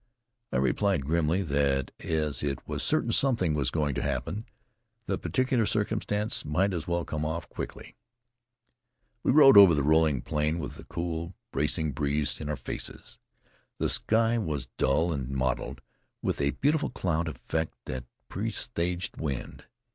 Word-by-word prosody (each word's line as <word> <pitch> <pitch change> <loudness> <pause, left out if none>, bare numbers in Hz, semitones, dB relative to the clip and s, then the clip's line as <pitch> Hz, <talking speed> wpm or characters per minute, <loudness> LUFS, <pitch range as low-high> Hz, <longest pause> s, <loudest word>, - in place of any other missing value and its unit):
I - - 0
replied 75 +3 +1
grimly 85 +4 +1
that, 70 -4 +1
as 75 -3 -1
it 70 -2 -3
was - - -2
certain - - +1
something 115 - +2
was 70 -4 +1
going 75 0 0
to - - -2
happen, 105 +8 -3 0.6
the - - -1
particular 130 -4 +1
circumstance 105 0 -1
might 95 +6 +1
as 85 -3 -3
well 85 -1 0
come 75 -1 -3
off 80 +2 -3
quickly. - - -7 1.3
We - - +2
rode 135 -4 +8
over 95 -5 +10
the 70 - +1
rolling 75 -3 +3
plain 75 +2 0
with 75 -4 -6
a - - -10
cool, 85 +1 -4 0.2
bracing 75 +2 0
breeze 75 +1 -1
in 75 - -4
our 75 - -1
faces. - - -7 0.6
The - - 0
sky 115 +1 +2
was 75 - -3
dull 80 +6 +2
and 65 -3 -3
mottled 65 -1 -2 0.4
with - - -1
a 70 - +2
beautiful 150 +3 +2
cloud 85 -2 -1
effect 80 +2 -3
that 65 -1 -5 0.2
presaged 90 +2 -2
wind. 70 -5 -4
80 Hz, 150 wpm, -28 LUFS, 70-95 Hz, 1.3 s, over